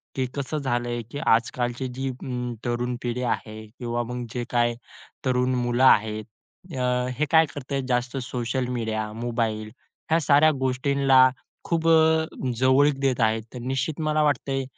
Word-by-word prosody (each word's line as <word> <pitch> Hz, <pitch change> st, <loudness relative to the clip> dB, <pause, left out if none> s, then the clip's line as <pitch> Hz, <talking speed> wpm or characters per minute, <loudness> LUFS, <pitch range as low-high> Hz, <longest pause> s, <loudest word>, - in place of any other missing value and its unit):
की, 130 Hz, -, 0 dB
कसं 140 Hz, +2 st, -3 dB
झालंय 120 Hz, -3 st, -2 dB
की 145 Hz, -, -5 dB
आजकालची 120 Hz, +2 st, 0 dB
जी 135 Hz, 0 st, -2 dB
अ, 125 Hz, -1 st, -4 dB
तरुण 120 Hz, +1 st, -1 dB
पिढी 120 Hz, +1 st, -2 dB
आहे 110 Hz, 0 st, -8 dB
किंवा 120 Hz, -1 st, -2 dB
मग 125 Hz, +1 st, -5 dB
जे 125 Hz, -, -2 dB
काही 120 Hz, -1 st, +1 dB, 0.5 s
तरुण 125 Hz, 0 st, +1 dB
मुलं 120 Hz, +1 st, 0 dB
आहेत, 110 Hz, -3 st, +4 dB, 0.5 s
अ, 125 Hz, 0 st, +1 dB
हे 155 Hz, -, +3 dB
काय 160 Hz, -1 st, +6 dB
करतंय 140 Hz, 0 st, -3 dB
जास्त 125 Hz, +1 st, -1 dB
सोशल 125 Hz, 0 st, -2 dB
मीडिया, 110 Hz, -2 st, -2 dB
मोबाईल 115 Hz, -2 st, -2 dB, 0.4 s
ह्या 165 Hz, +1 st, +4 dB
साऱ्या 150 Hz, +1 st, +5 dB
गोष्टींना 130 Hz, 0 st, +4 dB, 0.3 s
खूप 165 Hz, -1 st, -1 dB, 0.7 s
जवळीक 135 Hz, +2 st, +4 dB
देत 135 Hz, -2 st, +1 dB
आहेत. 110 Hz, 0 st, +2 dB
तर 125 Hz, -, -6 dB
निश्चित 135 Hz, +5 st, -2 dB
मला 155 Hz, 0 st, +1 dB
वाटत 145 Hz, -2 st, 0 dB
आहे, 135 Hz, 0 st, 0 dB
125 Hz, 150 wpm, -25 LUFS, 120-135 Hz, 0.7 s, काय